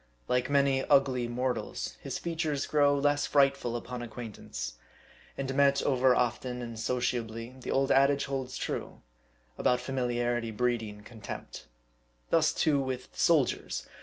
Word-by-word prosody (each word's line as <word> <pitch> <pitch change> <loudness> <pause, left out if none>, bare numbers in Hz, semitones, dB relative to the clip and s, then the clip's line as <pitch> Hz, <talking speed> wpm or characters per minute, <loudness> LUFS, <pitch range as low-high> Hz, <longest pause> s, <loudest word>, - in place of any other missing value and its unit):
Like 125 +1 +1
many 140 -1 +3
ugly 130 -3 +3
mortals, 125 +1 -2
his - - -4
features 160 -4 -2
grow 145 -1 +3
less 145 +1 +2
frightful 140 -4 +2
upon 125 +1 -5
acquaintance; 110 - -7 0.6
and 135 -1 -2
met 140 0 +4
over 130 -2 +4
often 125 0 -1
and 115 -1 -7
socia 125 +1 0
bly, 115 +2 -8
the - - -7
old 135 0 +2
adage 140 +1 +4
holds 135 -2 -4
true, - - -4 0.6
about 125 - +3
familiarity 120 -3 -1
breeding 110 -2 -2
contempt. 110 - -8 0.6
Thus - - +4
too 145 -3 +2
with 130 -1 -4
soldiers. 130 - +1
125 Hz, 135 wpm, -30 LUFS, 120-140 Hz, 0.6 s, met